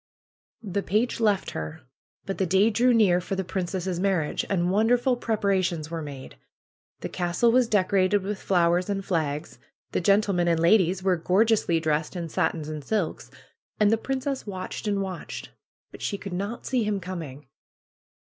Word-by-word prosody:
'^The 200 0 -2
page 220 +5 0
left 210 -4 +1
her. 160 0 -6 0.4
But 195 - -4
the 190 - +1
day 195 +6 +4
drew 245 +4 +3
near 200 -7 +4
for 195 - -3
the 190 - -1
princess' 185 -1 -3
marriage, 185 -6 0
and 180 -2 +1
wonderful 240 +5 +3
preparations 190 -8 0
were 165 -1 -3
made. 140 -3 -9 0.6
The - - -4
castle 180 +6 +1
was 250 0 +4
decorated 195 0 +2
with 200 +1 -4
flowers 175 0 +2
and 195 -1 -2
flags. 155 -4 -2 0.3
The - - 0
gen 200 +4 +4
tlemen 180 -4 0
and 165 -1 +2
ladies 185 +1 +3
were 185 -2 +2
gorgeously 190 0 +2
dressed 155 +1 -1
in 170 -2 -4
satins 155 0 -1
and 155 -1 -5
silks. 205 -1 -2 0.5
And 210 -1 +4
the - - +5
princess 265 +2 -3
watched 190 +2 -5
and 200 -1 0
watched; 185 -3 -6 0.4
but - - -12
she 200 - -2
could 195 -2 -7
not 200 +6 -4
see 250 -3 +1
him 210 -1 -1
coming." 165 -7 -7
190 Hz, 170 wpm, -26 LUFS, 170-210 Hz, 0.6 s, the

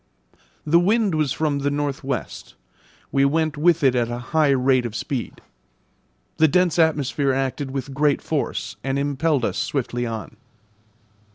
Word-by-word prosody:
The 165 +3 +4
wind 205 +2 +2
was 155 -4 0
from 150 -2 0
the 140 0 0
north 145 -1 -2
west. 135 -3 -5 0.6
We 135 - +2
went 155 +2 +1
with 165 +1 +2
it 135 -2 +5
at 120 -2 0
a 120 - -3 0.2
high 155 -2 +4
rate 130 -2 +2
of 110 - -9
speed. 125 0 -4 1.0
The 160 - +5
dense 180 +1 +2
atmosphere 145 -3 +2
acted 135 +1 -2
with 135 0 -5
great 145 0 +2
force 155 -3 -3
and 135 0 -1
impelled 145 -1 0
us - - -2
swiftly 120 -3 -2
on. 110 -1 -6
140 Hz, 155 wpm, -22 LUFS, 130-155 Hz, 1.0 s, it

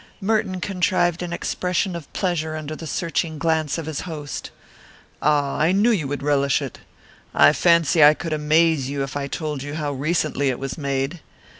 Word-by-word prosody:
Merton 195 -3 0
contrived 180 -2 0
an 175 -1 -4
expression 180 +1 -1
of 170 -4 -8
pleasure 160 -4 -1
under 155 0 -5
the 160 - -8
searching 165 0 -2
glance 160 -1 0
of 165 - -4
his 155 -2 -4
host. 150 -5 -6 0.7
"Ah, 145 -2 +1
I 160 +3 +3
knew 210 +5 +4
you 170 -11 0
would 140 0 -4
relish 140 -1 +2
it. - - -7 0.6
I 75 - +7
fancy 170 -2 +4
I 150 +1 +8
could 165 0 -4
amaze 155 -2 +2
you 140 -1 -2
if 135 0 -6
I 140 -1 -2
told 150 -2 -4
you 145 +2 -5
how 150 -2 -2
recently 145 -1 0
it 125 - -1
was 135 0 -5
made. 140 +2 -2
155 Hz, 180 wpm, -22 LUFS, 145-170 Hz, 0.7 s, I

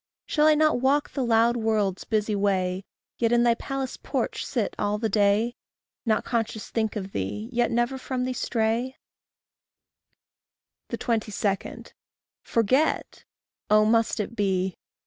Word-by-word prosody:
Shall 300 -1 +3
I 310 - +6
not 310 -3 +3
walk 280 +3 +2
the 270 - -2
loud 235 0 +3
world's 215 -4 0
busy 215 -1 0
way, 190 -2 0 0.3
Yet 230 -1 +2
in 240 0 +4
thy 240 -1 +5
palace 270 +2 -4
porch - - -2
sit - - -2
all 205 0 0
the 220 +1 -1
day? 210 +3 +2 0.5
Not 220 - +2
conscious 225 -3 -2
think 220 -1 -1
of 195 -2 -4
thee, 210 - -4
yet 240 -1 +1
never 240 +3 0
from 255 -1 -3
thee 255 - -2
stray? 235 +2 -1 1.9
22. 225 -2 -1 1.1
Forget! 255 +7 0 0.4
Oh, 215 0 +5
must 225 0 +2
it 215 +3 -3
be? 190 -3 0
225 Hz, 135 wpm, -26 LUFS, 210-245 Hz, 1.9 s, I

